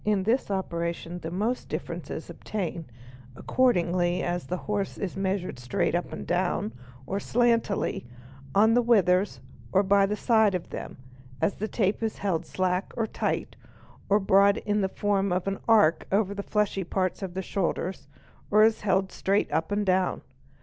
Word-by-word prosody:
i - - -1
In 200 -3 +2
this 230 +5 +1
operation 170 -2 -3
the 160 - -5
most 215 +8 -2
difference - - -5
is - - -5
obtained, 170 - -5 0.4
according 240 - +2 0.4
as 175 0 -2
the 180 - -2
horse 205 -2 -2
1s 195 -4 -4
measured 190 -6 -2
straight 165 +10 -1
up 175 +1 -1
and - - -6
down 175 - 0 0.3
or 195 +7 -2
slantingly, 230 - +1 0.5
on 220 +3 +5
the 245 - +5
withers 200 -5 +3 0.3
or 195 +1 +4
by 200 0 +4
the 210 - -1
side 220 -3 +3
of 180 - -5
them, - - -6 0.4
as 200 - +1
the 215 - -4
tape 205 -2 0
is 225 -1 -2
held 175 -5 -1
slack 185 +1 -1
or 230 - +1
tight, - - -2 0.5
or 205 +1 +5
brought 200 +1 +4
in 210 0 0
the 190 - 0
form 200 -1 0
of 180 +1 -1
an 195 0 -1
arc 210 -8 +4
over 200 0 +2
the 200 - -4
fleshy 205 -2 0
parts 185 +2 -1
of 185 -2 -5
the 190 - -2
shoulders, 185 -3 -2 0.4
or 210 +1 +6
is 220 0 +3
held 190 -2 +1
straight 200 +2 0
up 160 +4 -1
and 205 0 0
down. 185 -1 +1
195 Hz, 175 wpm, -27 LUFS, 180-210 Hz, 0.5 s, or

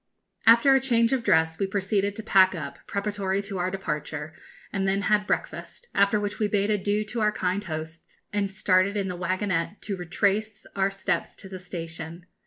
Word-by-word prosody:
After 235 +4 +7
a 270 - +5
change 235 -2 +2
of 255 -3 0
dress, 160 -4 +3
we 195 - +1
proceeded 200 +1 0
to 220 - -6
pack 190 -3 +5
up, 140 -4 -6
preparatory 200 -1 -1
to 195 -2 -5
our 180 +1 0
departure, 155 -5 -4 0.4
and 195 -1 0
then 195 +1 +1
had 210 0 +2
breakfast, 485 - -3
after 200 +1 +3
which 205 0 -3
we 215 - +2
bade 205 0 +1
adieu 205 +1 0
to 225 +2 -4
our 210 0 +3
kind 190 0 -1
hosts, 160 -1 -7
and 205 -1 0
started 195 +1 +2
in 195 -2 -1
the 180 - -3
waggonette 185 +1 -1
to 205 - -3
retrace 200 +4 -1
our 195 0 +2
steps 195 0 -2
to - - -11
the 190 -1 -8
station. 165 -1 -7
195 Hz, 190 wpm, -26 LUFS, 185-210 Hz, 0.4 s, After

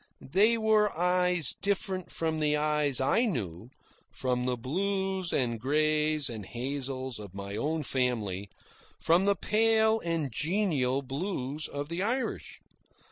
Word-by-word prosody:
They 215 +5 +6
were 215 -2 +3
eyes 180 -3 +2
different 190 -2 -1
from 160 -1 -2
the 150 -1 +2
eyes 150 -3 +1
I 180 - +3
knew, 110 - -4 0.4
from 125 -1 -1
the 125 -1 0
blues 190 +6 -1
and 120 -4 0
greys 155 +2 +2
and 110 -3 -6
hazels 130 +1 -4
of 100 -3 -10
my 100 0 -6
own 155 +7 -1
family, 110 -8 -1 0.5
from 170 +4 +3
the 200 0 +3
pale 220 +3 +3
and 165 - -2
genial 145 - 0
blues 140 0 -4
of 145 0 -5
the 170 +2 -3
Irish. 245 +6 -2
150 Hz, 135 wpm, -29 LUFS, 125-190 Hz, 0.5 s, They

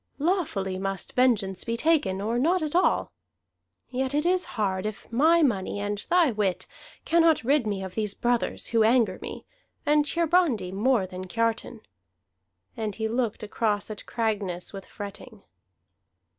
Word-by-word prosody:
Lawfully 280 - -1
must 195 -1 -4
vengeance 215 -7 +2
be 230 0 -2
taken, 235 -11 +2
or 230 +4 0
not 340 +6 +2
at 305 +1 -3
all. 360 - +2 0.8
Yet 260 +2 -1
it 300 +2 +1
is 365 +1 +2
hard 195 -1 0
if 215 +1 -8
my 320 +7 +4
money 205 -7 0
and 205 0 -2
thy 345 -6 +4
wit 205 -4 -1 0.4
cannot 330 -3 +4
rid 270 -1 +2
me 200 -2 -2
of 190 -1 -7
these 210 -1 -2
brothers, 240 -1 -1
who 230 -1 +2
anger 220 -4 +3
me, - - -7 0.4
and 295 0 +4
Hiarandi 325 - +1
more 215 +1 +2
than 185 0 -7
Kiartan." 230 +2 -1 0.9
And 215 -3 -3
he 220 0 -2
looked 230 -2 -2
across 210 -1 -1
at 210 - -8
Cragness 205 -7 -2
with 195 -1 -8
fretting. 205 +1 -9
225 Hz, 150 wpm, -26 LUFS, 200-285 Hz, 0.9 s, my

